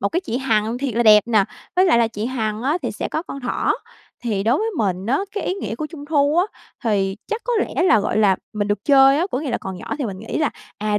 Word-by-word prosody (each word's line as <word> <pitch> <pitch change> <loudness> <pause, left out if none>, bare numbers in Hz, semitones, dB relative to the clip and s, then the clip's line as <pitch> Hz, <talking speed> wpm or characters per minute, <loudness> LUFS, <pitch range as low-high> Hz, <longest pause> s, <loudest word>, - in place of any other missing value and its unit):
một 200 - +1
cái 345 - -1
chị 245 -9 -3
Hằng 225 -3 0
thiệt 265 -4 -2
là 240 - +2
đẹp 210 -2 +7
nè, 220 -4 +3 0.3
với 370 - +5
lại 330 -11 +4
là 230 - +3
chị 220 -1 -4
Hằng 220 -3 -2
á 295 +6 +1
thì - - -2
sẽ - - -4
có 315 - -2
con 275 -5 -8
thỏ. 250 - 0 0.5
Thì 210 -5 -1
đối 230 +5 +2
với 445 +1 -1
mình 190 -2 -1
á, 260 - +2 0.2
cái 410 - -2
ý 370 - -1
nghĩa 385 - -4
của 305 +5 -4
Trung 295 -3 -10
thu 295 0 +2
á 355 - +4 0.4
thì 195 -3 +1
chắc 440 - -3
có - - -1
lẽ - - -1
là, 220 - +5
gọi 210 +1 -1
là, 195 -3 +4 0.2
mình 205 -1 -2
được 205 -1 -1
chơi 270 -1 +6
á, 350 - +1
có - - -1
nghĩa 295 -3 -3
là 235 - -1
còn 190 -1 -6
nhỏ 180 - -5
thì 275 - -1
mình 195 -4 -5
nghĩ 225 - -4
là, 305 -2 +1 0.3
à, 210 -1 0
235 Hz, 285 wpm, -21 LUFS, 210-290 Hz, 0.5 s, đẹp